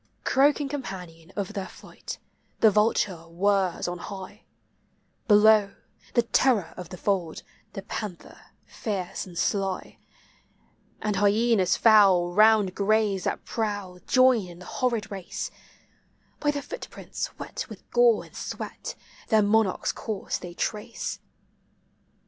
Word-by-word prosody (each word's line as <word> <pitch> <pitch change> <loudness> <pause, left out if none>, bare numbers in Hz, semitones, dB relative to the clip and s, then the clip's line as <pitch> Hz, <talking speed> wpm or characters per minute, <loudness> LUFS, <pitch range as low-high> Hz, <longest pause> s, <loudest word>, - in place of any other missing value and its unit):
Croaking 285 +1 +3
companion 185 - -7
of 200 0 -3
their 195 -3 -4
flight, - - -9 0.4
the 220 - +6
vulture 200 -5 +1
whirs 190 +1 +1
on 175 0 -4
high; 200 +2 -9 0.8
Below, 210 -1 +5 0.4
the 240 - +5
terror 230 -4 +2
of 180 -2 -8
the 180 - -8
fold, 180 -4 -1 0.3
the 195 - -6
panther 200 -3 -7 0.3
fierce 195 -4 -4
and 175 -2 -11
sly, 195 0 -1 1.0
And 210 -2 0
hyenas 205 -2 +3
foul, 195 -6 +5
round 215 -2 +5
graves 205 -2 +1
thai - - +1
prowl, 205 -5 -3
join 255 -6 +4
in 175 -1 -11
the 180 - -12
horrid 230 -3 -1
race; 195 -3 -5 0.9
By 295 - +1
the 290 -1 -1
footprints - - -6
wet - - -6
with - - -12
gore 485 -1 +4
and - - -18
sweat, - - -6 0.3
their 220 -2 +4
monarch's 210 -1 +2
course 215 -4 -4
they 175 -1 -9
trace. 215 +5 -3
205 Hz, 125 wpm, -26 LUFS, 185-220 Hz, 1.0 s, the